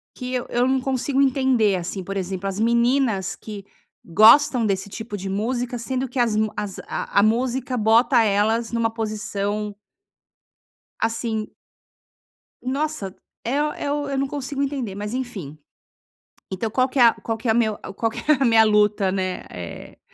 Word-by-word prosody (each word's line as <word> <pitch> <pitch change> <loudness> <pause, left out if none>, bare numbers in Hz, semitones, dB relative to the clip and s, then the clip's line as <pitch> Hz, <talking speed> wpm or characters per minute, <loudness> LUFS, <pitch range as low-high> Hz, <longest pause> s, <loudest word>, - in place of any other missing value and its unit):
que 250 -1 -5
eu 250 -1 -1
eu 245 +1 +1
não 265 0 +2
consigo 270 +1 0
entender, 260 -6 +3
assim, 185 +2 -4
por 195 +2 -5
exemplo, 190 +1 -3
as 195 +1 -3
meninas 235 -3 +2
que 205 -3 -9 0.4
gostam 230 - +6
desse 195 -1 -1
tipo 220 0 -6
de 195 0 -5
música, 240 +5 -2
sendo 255 +2 -2
que 250 - -9
as 235 -3 +2
mu 215 0 +1
as 205 -2 -4
a - - -1
a - - +5
música 250 +3 0
bota 230 +2 +4
elas 220 +2 +1
numa 230 -1 +1
posição 210 -2 -3 1.2
Assim 225 -1 -2 1.1
Nossa, 265 -6 -2 0.3
é 275 +5 +1
o 300 0 -1
é 285 - -3
o 290 -1 -2
eu 275 -1 -2
não 275 0 0
consigo 280 0 -3
entender, 270 -8 -3
mas, 210 +3 -5
enfim 205 - -5 0.9
então, 190 +4 -2
qual 255 +4 +1
que 270 - -4
é - - +7
a 230 -1 +7
qual 225 -1 -4
que 230 +2 -4
é 220 - +4
meu 220 -3 +1 0.2
qual 225 - 0
que - - -8
é - - +8
a - - +3
minha 225 -2 +6
luta, 210 -2 +3
né, 185 -1 -2
eh, 85 -2 -9
225 Hz, 175 wpm, -23 LUFS, 205-255 Hz, 1.2 s, é